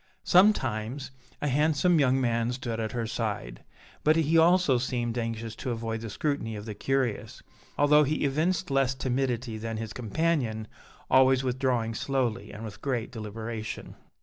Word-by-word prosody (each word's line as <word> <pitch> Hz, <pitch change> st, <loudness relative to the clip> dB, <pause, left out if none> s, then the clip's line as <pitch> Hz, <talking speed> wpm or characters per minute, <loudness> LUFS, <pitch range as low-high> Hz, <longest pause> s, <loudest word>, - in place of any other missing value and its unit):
Sometimes, 130 Hz, -, +2 dB, 0.3 s
a -, -, +1 dB
handsome 155 Hz, +4 st, +3 dB
young 135 Hz, -2 st, +3 dB
man 115 Hz, -1 st, +1 dB
stood 120 Hz, -3 st, -4 dB
at 110 Hz, +1 st, -3 dB
her 120 Hz, -2 st, -2 dB
side, 105 Hz, -, -4 dB, 0.4 s
but 155 Hz, +1 st, +5 dB
he 165 Hz, 0 st, +2 dB
also 165 Hz, -5 st, +5 dB
seemed 120 Hz, -2 st, -2 dB
anxious 115 Hz, -1 st, -3 dB
to 130 Hz, -, -4 dB
avoid 115 Hz, -1 st, -3 dB
the 115 Hz, -, -5 dB
scrutiny 125 Hz, -2 st, -2 dB
of 105 Hz, 0 st, -7 dB
the 110 Hz, -, -5 dB
curious, 130 Hz, +1 st, -2 dB, 0.3 s
although 150 Hz, +1 st, +5 dB
he 150 Hz, +1 st, 0 dB
evinced 160 Hz, +5 st, 0 dB
less 135 Hz, -1 st, +2 dB
timidity 125 Hz, -3 st, -2 dB
than 115 Hz, 0 st, -4 dB
his 110 Hz, -1 st, -5 dB
companion, 120 Hz, -2 st, -1 dB, 0.4 s
always 130 Hz, 0 st, +5 dB
withdrawing 125 Hz, -3 st, 0 dB
slowly 120 Hz, -5 st, -1 dB
and 110 Hz, +2 st, -8 dB
with 105 Hz, -, -9 dB
great 125 Hz, -4 st, -2 dB
deliberation. 110 Hz, 0 st, -6 dB
125 Hz, 150 wpm, -28 LUFS, 115-140 Hz, 0.4 s, but